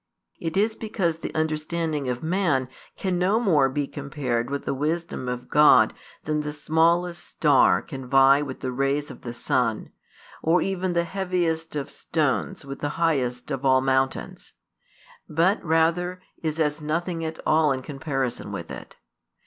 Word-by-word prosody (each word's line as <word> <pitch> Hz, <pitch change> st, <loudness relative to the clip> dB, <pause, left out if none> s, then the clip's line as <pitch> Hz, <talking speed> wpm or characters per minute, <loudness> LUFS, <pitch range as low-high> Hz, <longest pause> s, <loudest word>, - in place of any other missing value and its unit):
It 165 Hz, +2 st, -3 dB
is 215 Hz, +2 st, +2 dB
because 190 Hz, -7 st, -1 dB
the -, -, -5 dB
understanding 155 Hz, -2 st, -1 dB
of 125 Hz, +2 st, -3 dB
man 160 Hz, -7 st, +1 dB, 0.3 s
can 185 Hz, -2 st, -1 dB
no 195 Hz, +5 st, +3 dB
more 155 Hz, -, +3 dB
be 145 Hz, +2 st, -1 dB
compared 135 Hz, -4 st, -3 dB
with 140 Hz, 0 st, -4 dB
the -, -, -1 dB
wisdom 150 Hz, -2 st, -2 dB
of 125 Hz, 0 st, -5 dB
God 150 Hz, 0 st, +6 dB, 0.3 s
than 150 Hz, 0 st, -1 dB
the 150 Hz, 0 st, -4 dB
smallest 170 Hz, +3 st, +1 dB
star 145 Hz, -4 st, +3 dB
can 135 Hz, -4 st, -8 dB
vie 135 Hz, +2 st, +6 dB
with 135 Hz, -3 st, -6 dB
the 130 Hz, -, -2 dB
rays 140 Hz, +3 st, -1 dB
of -, -, -12 dB
the 120 Hz, -, -6 dB
sun, 120 Hz, -, -1 dB, 0.5 s
or 165 Hz, +3 st, +3 dB
even 185 Hz, -2 st, -1 dB
the 170 Hz, 0 st, +2 dB
heaviest 170 Hz, -3 st, -2 dB
of 145 Hz, -2 st, -3 dB
stones 140 Hz, -, -1 dB
with 135 Hz, 0 st, -7 dB
the 145 Hz, -, -2 dB
highest 135 Hz, -6 st, 0 dB
of 135 Hz, -1 st, -3 dB
all 130 Hz, -1 st, +5 dB
mountains; 135 Hz, 0 st, -1 dB, 0.8 s
but 170 Hz, +7 st, +2 dB
rather 170 Hz, +3 st, +1 dB, 0.2 s
is 160 Hz, -1 st, -2 dB
as 150 Hz, 0 st, 0 dB
nothing 165 Hz, +2 st, -2 dB
at 160 Hz, 0 st, -4 dB
all 155 Hz, -1 st, +4 dB
in 130 Hz, -1 st, -2 dB
comparison 135 Hz, -3 st, -3 dB
with -, -, -6 dB
it. -, -, -9 dB
155 Hz, 160 wpm, -25 LUFS, 135-170 Hz, 0.8 s, God